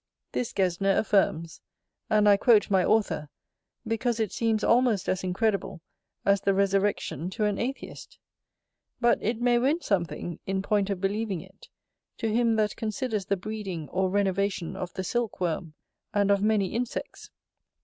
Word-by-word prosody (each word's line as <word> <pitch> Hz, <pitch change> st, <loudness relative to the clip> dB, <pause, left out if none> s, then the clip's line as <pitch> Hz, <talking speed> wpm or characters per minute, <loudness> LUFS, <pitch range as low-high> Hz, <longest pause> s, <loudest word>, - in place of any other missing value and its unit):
This 245 Hz, -, -2 dB
Gesner 195 Hz, +1 st, +1 dB
affirms; 185 Hz, -6 st, +1 dB, 0.5 s
and 210 Hz, -1 st, +4 dB
I 205 Hz, -, +7 dB
quote 210 Hz, -1 st, +4 dB
my 190 Hz, -2 st, +4 dB
author, 190 Hz, -9 st, +1 dB, 0.6 s
because 230 Hz, +1 st, -1 dB
it 220 Hz, -4 st, 0 dB
seems 225 Hz, -2 st, 0 dB
almost 235 Hz, -5 st, +3 dB
as 185 Hz, 0 st, 0 dB
incredible 195 Hz, 0 st, -1 dB, 0.5 s
as 200 Hz, -1 st, +3 dB
the 195 Hz, -1 st, +2 dB
resurrection 195 Hz, -4 st, 0 dB
to 210 Hz, +3 st, -1 dB
an 205 Hz, -1 st, 0 dB
atheist: 265 Hz, +4 st, -5 dB, 0.8 s
but 240 Hz, -1 st, +3 dB
it 225 Hz, +2 st, -1 dB
may 240 Hz, 0 st, +3 dB
win 280 Hz, +7 st, +2 dB
something, 175 Hz, -, -2 dB
in 190 Hz, 0 st, -1 dB
point 205 Hz, -1 st, +1 dB
of 195 Hz, -2 st, -2 dB
believing 200 Hz, -2 st, -1 dB
it, -, -, -17 dB, 0.5 s
to 225 Hz, -2 st, -1 dB
him 230 Hz, -1 st, +3 dB
that 215 Hz, -1 st, +1 dB
considers 220 Hz, -2 st, -2 dB
the 200 Hz, -, 0 dB
breeding 190 Hz, -5 st, -5 dB
or 190 Hz, 0 st, 0 dB
renovation 195 Hz, -2 st, 0 dB
of 180 Hz, -1 st, -5 dB
the 190 Hz, -, -3 dB
silk 235 Hz, +2 st, -2 dB
worm, 170 Hz, -2 st, -2 dB, 0.4 s
and 200 Hz, -1 st, +3 dB
of 200 Hz, -1 st, +3 dB
many 210 Hz, -3 st, +1 dB
insects. 240 Hz, +1 st, -4 dB
200 Hz, 155 wpm, -27 LUFS, 190-225 Hz, 0.8 s, I